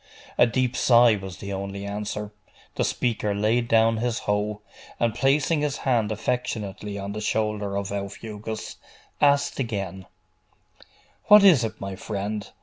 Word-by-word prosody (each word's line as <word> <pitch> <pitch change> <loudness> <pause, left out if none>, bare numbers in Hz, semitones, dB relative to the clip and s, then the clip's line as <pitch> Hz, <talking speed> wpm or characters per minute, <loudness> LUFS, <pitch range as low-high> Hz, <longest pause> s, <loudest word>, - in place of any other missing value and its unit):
A 120 - +5
deep 125 +1 0
sigh 120 -2 +5
was 95 -2 -7
the 100 0 -6
only 100 +1 -5
answer. 105 0 -4 0.4
The - - -1
speaker 105 -4 -1
laid 110 +4 +1
down 115 0 +4
his 120 +1 -1
hoe, 105 0 -1 0.4
and 115 -2 +1
placing 145 +5 +2
his 145 -1 -1
hand 115 -5 +1
affectionately 105 -3 -3
on 100 0 -5
the 105 - -5
shoulder 105 -2 -1
of 100 0 -3
Aufugus, 105 +2 -6 0.4
asked 140 -1 +3
again 95 -7 -4 1.2
'What 210 -1 +8
is 170 -11 +7
it, 110 - -4
my 100 0 -5
friend? 105 +1 -4
105 Hz, 145 wpm, -25 LUFS, 100-120 Hz, 1.2 s, What